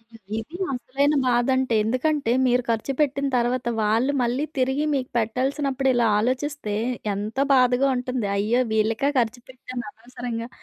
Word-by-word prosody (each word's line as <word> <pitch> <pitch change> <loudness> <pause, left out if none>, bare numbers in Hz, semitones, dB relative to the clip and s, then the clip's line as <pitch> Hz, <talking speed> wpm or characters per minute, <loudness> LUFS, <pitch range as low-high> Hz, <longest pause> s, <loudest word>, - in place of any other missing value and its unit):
అయ్యో! - - -14 0.2
ఇది 315 +11 -8 0.2
అసలైన 270 +4 0
బాధంటే. 250 0 +2
ఎందుకంటే, 255 +3 0
మీరు 250 0 +2
ఖర్చుపెట్టిన 275 +4 0
తర్వాత 240 +1 0
వాళ్ళు 225 +6 +2
మళ్ళీ 245 +5 0
తిరిగి 265 +3 +1
మీకు 265 -2 -1
పెట్టాల్సినప్పుడిలా 260 +1 +1
ఆలోచిస్తే 255 -1 -2 0.4
ఎంత 210 +5 -5 0.2
బాధగా 255 +1 +4
ఉంటుంది? 250 -3 -2
అయ్యో! 220 +5 +2
వీళ్ళక 220 +6 +1
ఖర్చు 240 +1 -1
పెట్టాను 255 -1 -7
అనవసరంగా. 235 0 -6
250 Hz, 125 wpm, -24 LUFS, 230-270 Hz, 0.4 s, బాధగా